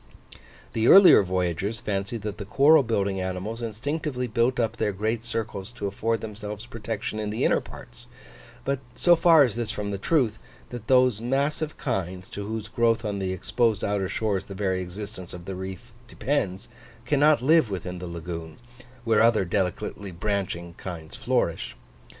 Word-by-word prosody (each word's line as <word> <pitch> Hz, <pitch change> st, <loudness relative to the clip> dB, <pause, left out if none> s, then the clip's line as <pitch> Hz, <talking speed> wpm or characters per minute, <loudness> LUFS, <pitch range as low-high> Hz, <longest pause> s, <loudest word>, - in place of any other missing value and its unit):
The 115 Hz, +1 st, +1 dB
earlier 195 Hz, -, +9 dB
voyagers 95 Hz, +3 st, -1 dB
fancied 100 Hz, +2 st, -3 dB
that 105 Hz, -1 st, -5 dB
the 100 Hz, -, -5 dB
coral 145 Hz, +9 st, +6 dB
building 100 Hz, -5 st, -1 dB
animals 95 Hz, +5 st, -4 dB
instinctively 125 Hz, +4 st, -3 dB
built 120 Hz, +2 st, +1 dB
up 115 Hz, -1 st, 0 dB
their 105 Hz, -, 0 dB
great 110 Hz, +4 st, -1 dB
circles 110 Hz, -3 st, -4 dB
to 120 Hz, -4 st, -5 dB
afford 110 Hz, +3 st, -1 dB
themselves 105 Hz, 0 st, -6 dB
protection 110 Hz, -2 st, -4 dB
in 105 Hz, -1 st, -2 dB
the 110 Hz, -, -2 dB
inner -, -, +3 dB
parts; -, -, -12 dB, 0.6 s
but 140 Hz, -1 st, 0 dB, 0.2 s
so 175 Hz, -1 st, +5 dB
far 165 Hz, -2 st, +6 dB
is 120 Hz, -, -3 dB
this 120 Hz, -2 st, -2 dB
from 105 Hz, -1 st, -3 dB
the 100 Hz, -, -3 dB
truth, 120 Hz, -4 st, +1 dB, 0.3 s
that 120 Hz, -2 st, -7 dB
those 125 Hz, -4 st, +4 dB
massive 140 Hz, +5 st, -1 dB
kinds, 90 Hz, 0 st, -3 dB
to 100 Hz, 0 st, -6 dB
whose 110 Hz, -1 st, -4 dB
growth 115 Hz, -1 st, +1 dB
on 100 Hz, -1 st, -2 dB
the 95 Hz, -1 st, -2 dB
exposed 110 Hz, +3 st, 0 dB
outer 100 Hz, -2 st, 0 dB
shores 100 Hz, -4 st, -1 dB
the 100 Hz, -, -9 dB
very 95 Hz, -2 st, 0 dB
existence 95 Hz, 0 st, -7 dB
of 85 Hz, -1 st, -10 dB
the 95 Hz, -, -5 dB
reef 95 Hz, +5 st, -7 dB, 0.2 s
depends, 105 Hz, -8 st, -2 dB, 0.4 s
cannot 145 Hz, 0 st, +4 dB
live 155 Hz, -3 st, +4 dB
within 90 Hz, -2 st, -5 dB
the 90 Hz, -, -6 dB
lagoon, 85 Hz, -1 st, -6 dB, 0.5 s
where 115 Hz, -2 st, +3 dB
other 115 Hz, -4 st, +4 dB
delicately 95 Hz, +1 st, -2 dB
branching 90 Hz, -2 st, -3 dB
kinds 80 Hz, -4 st, -7 dB
flourish. -, -, -1 dB
105 Hz, 165 wpm, -26 LUFS, 95-120 Hz, 0.6 s, earlier